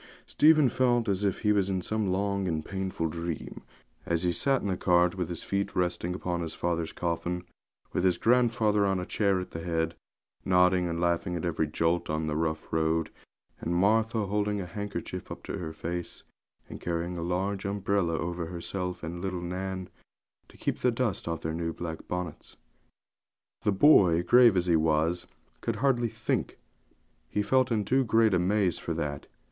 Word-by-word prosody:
Stephen 155 -2 +5
felt 120 -1 +2
as 100 0 0
if 100 -2 0
he 105 - +3
was 100 -2 +2
in 95 -1 0
some 110 +3 -1
long 100 +1 0
and 80 -3 -2
painful 95 -4 -2
dream, 85 0 -5 0.4
as 85 0 -1
he 90 - +2
sat 135 +7 +1
in - - -1
the 95 - 0
cart, 90 -1 +3
with 90 -3 -3
his 85 - -4
feet 100 0 -2
resting 90 0 -1
upon 90 -2 -2
his 80 -1 -4
father's 85 -2 -1
coffin, 90 +1 -2 0.5
with - - 0
his 95 -1 +3
grandfather 115 -3 +3
on 95 -1 +1
a 90 - -3
chair 100 -2 +1
at 90 - -6
the 80 - -5
head, 80 -1 -1 0.5
nodding 90 -1 +3
and 85 -1 -2
laughing 85 0 0
at 85 - -3
every 80 -2 0
jolt 85 +3 0
on 80 +1 -1
the 75 -1 -2
rough 80 0 -2
road, 80 0 +1 0.5
and 85 - -2
Martha 110 +3 +2
holding 105 +1 0
a 95 - -4
handkerchief 100 +4 -6
up - - -7
to - - -5
her 80 -3 -4
face, 85 +2 -5 0.4
and - - -9
carrying 85 +1 -2
a 85 - -4
large 95 +3 -1
umbrella 100 -4 0
over 85 0 -3
herself 90 +1 -4
and 85 +2 -5
little 95 -2 -2
Nan, 95 +1 -4 0.6
to - - -18
keep - - -2
the 125 - +3
dust 115 -7 -1
off 85 -1 -2
their 80 - -3
new 85 0 -2
black 80 -1 -6
bonnets. 90 -4 -5 1.0
The 105 - +2
boy, 95 - +5
grave 120 +1 +6
as 90 - +2
he 85 -2 +3
was, 80 +2 +1 0.3
could 115 - -1
hardly 120 -1 +1
think; - - -2 0.7
he 105 - 0
felt 130 +2 +2
in 105 -3 +1
too 130 +1 +3
great 110 -2 +3
a 90 - +4
maze 95 -1 +1
for 85 - -3
that. 75 -3 -4
90 Hz, 185 wpm, -28 LUFS, 85-100 Hz, 1.0 s, grave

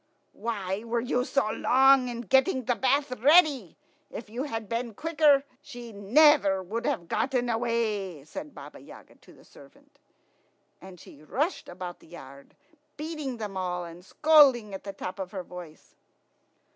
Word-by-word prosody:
"Why 205 -3 -4
were 235 0 -1
you 245 +1 -1
so 275 -2 0
long 265 +2 +4
in 240 -1 -5
getting 260 +3 +2
the 245 +2 +1
bath 270 +4 0
ready? 285 - +4 0.3
If 215 -1 -9
you 250 +5 -4
had 225 -6 -5
been 230 0 -4
quicker, 305 -2 +3 0.2
she 240 -4 -10
never 205 -1 +4
would 220 +6 -4
have 170 - -2
got 245 +9 -1
away," 225 - -1
said 290 - -9
Baba - - -11
Yaga - - -15
to - - -20
the - - -20
servant. 285 +1 -20 0.8
And 185 -2 -12
she 145 - -15
rushed 290 - -3
about 180 0 -8
the - - -20
yard, 140 -5 -13 0.4
beating 300 -4 -5
them 210 -3 -6
all, 180 -1 -3
and 170 +1 -12
scolding 270 - +4
at 195 - -8
the 200 - -6
top 185 +1 -7
of 190 +1 -6
her 190 -2 -5
voice. 175 -3 -12
230 Hz, 160 wpm, -27 LUFS, 190-275 Hz, 0.8 s, long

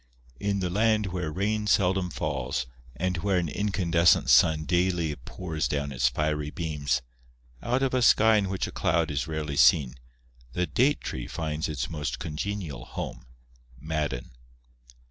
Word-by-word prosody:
" 60 0 -28
In 100 -1 0
the 90 - -1
land 105 +2 +2
where 90 -4 -2
rain 105 +5 -1
seldom 95 -2 +2
falls 70 -7 -2 0.3
and 90 +5 -1
where 95 +2 +1
an 90 -2 0
in 105 +7 -2
candescent 85 -7 +3
sun 80 +5 +5
daily 85 -3 +1
pours 80 +3 -4
down 70 +1 -2
its 60 -2 +2
fiery 75 +2 -1
beams, 70 -5 -2 0.6
out 125 +3 0
of 135 - 0
a 130 - +2
sky 110 -1 +5
in 100 -2 0
which 95 -2 -1
a - - -6
cloud 80 -2 +1
is 70 +1 -2
rarely 75 -3 -3
seen, 65 -5 +5 0.6
the 90 - 0
date 130 - +2
tree 60 - -5
finds 80 -1 -3
its 70 -5 -2
most 75 -2 -4
congenial 80 -4 -4
home,, - - -7 0.5
(Madden). 75 -4 -3
80 Hz, 160 wpm, -27 LUFS, 75-95 Hz, 0.6 s, sun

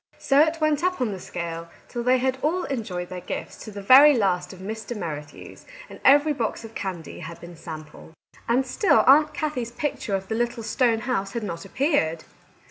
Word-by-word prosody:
So 275 0 +2
it 315 +2 +3
went 310 0 +1
on 365 0 +2
up - - -13
the 215 -7 -2
scale, 170 -2 -6 0.2
till 240 - -4
they 250 +2 +3
had 260 +1 -1
all 350 +5 0
enjoyed 195 -10 -4
their 180 -1 -6
gifts - - -6
to 215 - -8
the 200 -1 -8
very 270 +5 +8
last 180 -4 0
of 190 - -11
Mr. 220 +4 -6
Merrithew's, 150 -6 -8 0.2
and - - -11
every 290 +3 +5
box 230 -3 -3
of 225 - -11
candy 185 -7 -6
had 170 0 -8
been 175 0 -11
sampled. 155 -1 -10 0.4
And 255 +3 +2
still 290 - +3
Aunt 300 +3 +5
Kathie's 275 -7 -2
picture 240 -7 -2
of 190 0 -4
the - - -3
little 235 0 -2
stone 230 -1 +1
house 200 -6 -2
had 235 - -3
not 170 -2 -5
appeared 195 - 0
225 Hz, 200 wpm, -24 LUFS, 180-270 Hz, 0.4 s, very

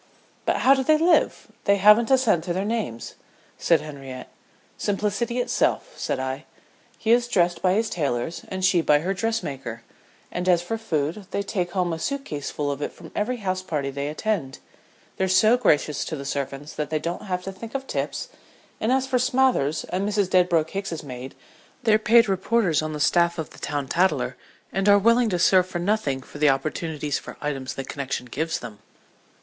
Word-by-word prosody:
"But - - +2
how 270 - +7
do 265 -1 +1
they 310 +3 +4
live? 335 +2 +2
they 200 - +5
haven't 210 +3 +6
a 265 - +6
cent 215 -11 +2
to 175 - -1
their 190 +3 -1
names," 210 - -3 0.5
said 165 -3 +3
Henriette. 135 -4 -8 0.5
"Simplicity 210 +4 -1
itself," - - 0
said - - -2
I. 130 +3 -4 0.5
"He 225 - 0
is 240 0 +4
dressed 175 -6 +1
by 185 -1 +3
his 220 +3 +1
tailors 145 - -2
and 190 -1 -2
she 185 -2 +4
by 150 -2 +3
her 185 +4 -1
dressmaker; 140 - -3 0.5
and 180 +1 -1
as 175 -1 +4
for 225 +6 -3
food, 170 -1 -2
they 200 - -2
take 180 -3 -2
home 180 -3 0
a 160 - -4
suit 280 - -3
case 145 -2 -4
full 145 -1 -2
of 140 0 -5
it - - -2
from - - -13
every 245 +4 -1
house 185 -4 -2
party 150 -6 -3
they 140 +1 -3
attend. 155 -3 -2 0.6
They're 190 - +1
so 200 +5 +5
gracious 150 -11 +2
to 160 - -4
the 140 -2 -7
servants 140 +1 -4
that 150 -1 -3
they 155 - 0
don't 170 +5 -4
have 180 -1 -2
to 195 - -5
think 220 +6 -10
of 270 0 -2
tips; - - -3 0.5
and 220 - 0
as 265 0 +2
for 260 -1 +1
Smathers, 250 - +2
and 190 +3 -2
Mrs. 205 -3 0
Dedbroke 175 -3 +3
Hicks's 195 -5 -4
maid, 130 -1 -8 0.5
they're 220 -2 +4
paid 230 +1 +5
reporters 195 -3 +1
on 155 0 -3
the 150 - -4
staff 170 +3 +3
of 160 -2 -5
The - - -14
Town 145 -2 -3
Tattler 185 +6 +1 0.4
and 195 +1 +2
are 205 - +8
willing 230 +3 +4
to 180 - 0
serve 185 +1 +4
for 185 - -4
nothing 175 -8 0
for 145 - -12
the 150 -1 +5
opportunities 150 +1 -1
for - - -10
items 135 -3 -4
the 135 - -5
connection 135 -2 -4
gives 160 +7 -2
them." 105 -2 -9
180 Hz, 200 wpm, -24 LUFS, 150-215 Hz, 0.6 s, are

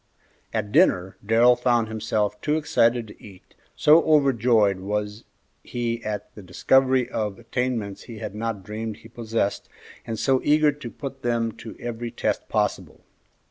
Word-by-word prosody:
At 105 -2 -3
dinner 95 - +3
Darrell 115 +4 +5
found 120 -2 +1
himself 110 -1 -2
too 150 +1 +1
excited 120 -7 +2
to 105 - -15
eat, 95 -4 -15 0.2
so 155 +2 +6
overjoyed 120 -9 +3
was 105 +2 -4 0.4
he 120 -1 -3
at 105 -1 -5
the 105 - -11
discovery 130 +7 +2
of 105 -5 -3
attainments 120 -4 -3
he 115 -3 -9
had 105 -2 -6
not 110 -2 -4
dreamed 110 +1 -5
he 110 - -14
possessed, 115 -3 -2 0.4
and 115 - -3
so 130 +3 +2
eager 150 0 +4
to 145 -4 -8
put 135 +2 -8
them 115 -2 0
to 110 - -9
every 120 0 -5
test - - -2
possible. - - -2
115 Hz, 150 wpm, -24 LUFS, 105-125 Hz, 0.4 s, so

